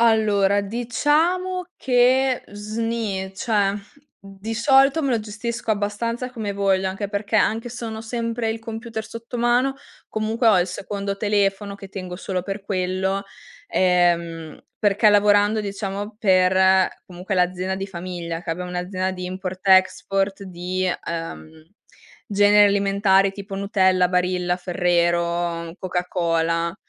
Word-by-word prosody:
Allora, 210 -3 +3
diciamo 300 - 0
che 255 +1 +3
sni, 210 -2 -3
cioè 205 -3 +1 0.5
di 195 +3 -6
solito 270 +5 +4
me 275 - 0
lo 235 -3 +1
gestisco 225 +2 -4
abbastanza 230 +4 -2
come 220 -5 -4
voglio, 195 -1 +1
anche 195 +2 -4
perché, 205 0 -1
anche 225 +2 +1
se 240 0 -7
non 225 - -4
ho - - -6
sempre 230 0 -3
il 225 - -3
computer 225 0 -6
sotto 230 +2 -8
mano, 245 +3 +2 0.3
comunque 220 +2 0
ho 210 - +5
il 175 - +2
secondo 200 +2 -4
telefono 200 -1 0
che 195 -1 -11
tengo 185 -2 -7
solo 185 0 -3
per 195 +2 -5
quello. 190 0 -1 0.5
Ehm, 170 -3 +1 0.2
perché 205 +1 +3
lavorando 205 +1 +4
diciamo 200 +1 -5
per 190 -1 +4 0.2
comunque 180 +2 -5
l'azienda 185 +1 0
di 195 0 -4
famiglia, 175 -2 -6
che 170 - -4
abbiamo 180 +2 -4
un'azienda 185 +1 -2
di 180 -1 -6
import, 185 0 -5
export, 195 +1 +3
di, 185 0 -2 0.2
uhm, 165 -1 -6 0.6
generi 205 0 +5
alimentari 195 -1 +3
tipo 195 0 -8
Nutella, 190 -2 +2
Barilla, 180 0 0
Ferrero, 170 -1 0
Coca-Cola, 170 -2 -1
195 Hz, 130 wpm, -22 LUFS, 185-220 Hz, 0.6 s, ho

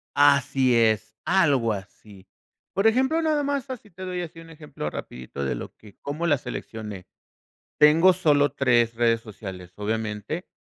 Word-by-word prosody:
Así 140 -3 +4
es, 110 -1 +2
algo 145 -11 +3
así. 100 -1 -10 0.5
Por 195 +3 +2
ejemplo, 265 +8 +3
nada 310 -2 +1
más 280 -1 -2
así 225 -5 -8
te 185 +1 -12
doy 180 -1 -3
así 165 -1 -8
un 165 0 -14
ejemplo 150 - -7
rapidito 65 +1 -7
de 65 - -1
lo - - -7
que 105 -2 -17
cómo 150 +4 -3
la 150 -4 +4
seleccioné. 105 -6 -7 0.7
Tengo 160 +5 +7
solo 145 -6 +3
3 120 -4 +2
redes 115 -1 +2
sociales, 95 -5 -9
obviamente. 110 - -3
140 Hz, 155 wpm, -25 LUFS, 110-170 Hz, 0.7 s, Tengo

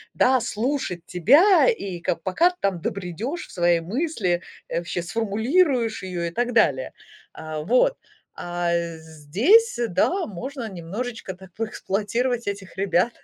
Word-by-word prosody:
да, 255 -1 +4
слушать 230 - -2
тебя, 290 - +5
и 195 - -3
ка 170 - -1
пока 195 - +2
ты 360 - -11
там 190 -4 0
добредёшь 200 - -4
в - - -16
свои 175 -1 +2
мысли, 195 - -1 0.3
э, - - -2
вообще 175 0 -4
сформулируешь 230 - +1
её 180 -2 -4
и 170 - -2
так 245 +5 -1
далее. 135 - +2 0.4
А, 155 -1 -6
вот, 255 - +3 0.4
а 175 0 -2 0.3
здесь, 185 - +2
да, 350 - +1
можно 245 - -6
немножечко 195 +3 -5
так 190 0 -14
поэксплуатировать 225 +2 -2
этих 200 -2 -5
ребят. 195 +3 +2
200 Hz, 135 wpm, -24 LUFS, 175-250 Hz, 0.4 s, тебя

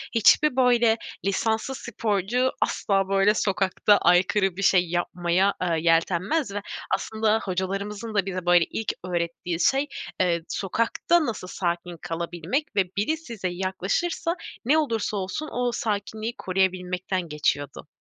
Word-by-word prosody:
hiçbir, 260 +5 +5
böyle, 240 -3 +4 0.3
lisanslı 220 +6 0
sporcu 230 +2 0
asla 195 -1 +1
böyle 195 +1 +4
sokakta 200 0 +2
aykırı 185 +2 +3
bir - - -3
şey 180 -3 +3
yapmaya, 175 +2 +1
ııı, 170 -2 +1
yeltenmez 175 - +1
ve 205 - -3 0.3
aslında 220 0 0
hocalarımızın 200 +4 -3
da 200 -2 +2
bize, 185 -2 -4
böyle, 175 -1 +5
ilk 220 - -3
öğrettiği 170 -1 -2
şey, 270 +8 +2 0.3
eee, 175 -2 +2
sokakta 230 - +1
nasıl 220 -7 -4
sakin 175 -1 -3
kalabilmek 170 - -3
ve 195 - +4
biri 260 +11 +1
size 230 - -5
yaklaşırsa 190 - -1 0.3
ne 290 +6 +4
olursa 225 -8 0
olsun 200 +11 -4
o 245 0 0
sakinliği 220 0 -3
koruyabilmekten 185 0 -1
geçiyordu. 145 -1 -2
195 Hz, 125 wpm, -25 LUFS, 180-225 Hz, 0.3 s, hiçbir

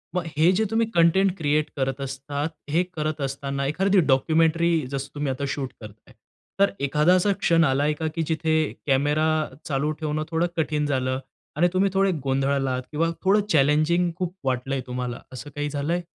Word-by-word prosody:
मग 180 -1 -1
हे 165 +3 +5
जे 220 - +2
तुम्ही 225 0 +2
कंटेंट 180 +3 +4
क्रिएट 150 -1 +1
करत 135 0 -1
असतात, 140 +3 -4 0.2
हे 170 +4 +2
करत 155 -1 -3
असताना 140 0 -3
एखादी 190 +5 +2
डॉक्युमेंटरी 165 +4 +3 0.2
जसं 140 0 -4
तुम्ही 145 -2 -1
आता 135 +2 -4
शूट 140 -2 -3
करताय, 105 +1 -13 0.5
तर 200 - +4
एखादा 150 +5 +3
असा 190 +2 +2
क्षण 165 0 +3
आलाय 145 +2 +2
का 160 +1 -3
की 165 - 0
जिथे 160 0 0 0.3
कॅमेरा 145 +3 +2 0.4
चालू 145 +2 0
ठेवणं 155 0 -2
थोडं 165 +2 +1
कठीण 150 -2 0
झालं 130 -2 -1 0.4
आणि 175 +2 +4
तुम्ही 195 +2 +3
थोडे 195 0 +3
गोंधळालात 135 -1 0
किंवा 165 +2 +1
थोडं 200 +2 +4
चॅलेंजिंग 155 +4 +3
खूप 180 0 -4
वाटलंय 130 +1 -1
तुम्हाला 125 -1 -4
असं 140 +3 -8
काही 145 0 -2
झालंय? 150 +5 -1
150 Hz, 165 wpm, -24 LUFS, 135-170 Hz, 0.5 s, हे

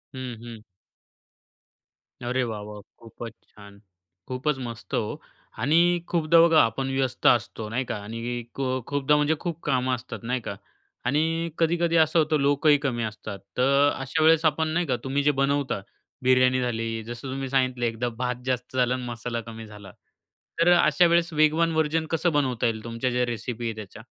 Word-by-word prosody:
हं, 130 -2 -5
हं. 115 -2 -9 1.7
अरे 130 +2 0
वाह! 110 -3 -4
वाह! 105 0 -9 0.2
खूपच 115 0 -9
छान! 100 -1 -15 0.5
खूपच 130 +4 -1
मस्त 120 -2 -8
हो 105 - -2 0.4
आणि 140 +8 +2 0.3
खूपदा 165 -1 +3
बघा 165 -1 +6
आपण 125 +4 0
व्यस्त 130 -2 -2
असतो, 115 -2 +2
नाही 125 +4 -2
का - - -2
आणि 115 +2 -4
खु 135 - -2 0.2
खूपदा 145 +1 +2
म्हणजे 150 +2 +2
खूप 170 -2 -4
कामं 130 -2 +1
असतात, 120 -2 -8
नाही 125 +1 -1
का 100 - -5 0.5
आणि 165 +3 +1
कधी-कधी 170 0 +1
असं 160 +1 +4
होतं 155 -1 +2
लोकही 145 +1 +4
कमी 120 -2 -2
असतात 110 -2 -6 0.2
तर 140 +3 +4
अशा 135 +4 -1
वेळेस 160 0 +5
आपण 160 +1 +2
नाही 170 +3 0
का 125 - +1
तुम्ही 140 +2 0
जे 150 - +4
बनवता 140 -6 0 0.4
बिर्याणी 130 0 +4
झाली, 115 -2 -2
जसं 120 +3 -7
तुम्ही 135 0 -4
सांगितले 130 -2 +1
एकदा 115 +2 -2
भात 125 -1 -2
जास्त 130 0 -3
झालं 125 0 +3
आणि 130 - -3
मसाला 120 0 -4
कमी 115 0 -9
झाला 105 -2 -12 0.7
तर 175 +1 +5
अशा 175 0 +4
वेळेस 170 0 +2
वेगवान 155 +2 +3
व्हर्जन 160 0 +1
कसं 170 +1 +1
बनवता 130 -5 0
येईल 110 -2 -1
तुमच्या 115 +2 -2
ज्या 125 0 +1
रेसिपी 120 0 -4
आहे 115 - -2
त्याच्या? 105 -3 -9
130 Hz, 170 wpm, -25 LUFS, 115-150 Hz, 1.7 s, बघा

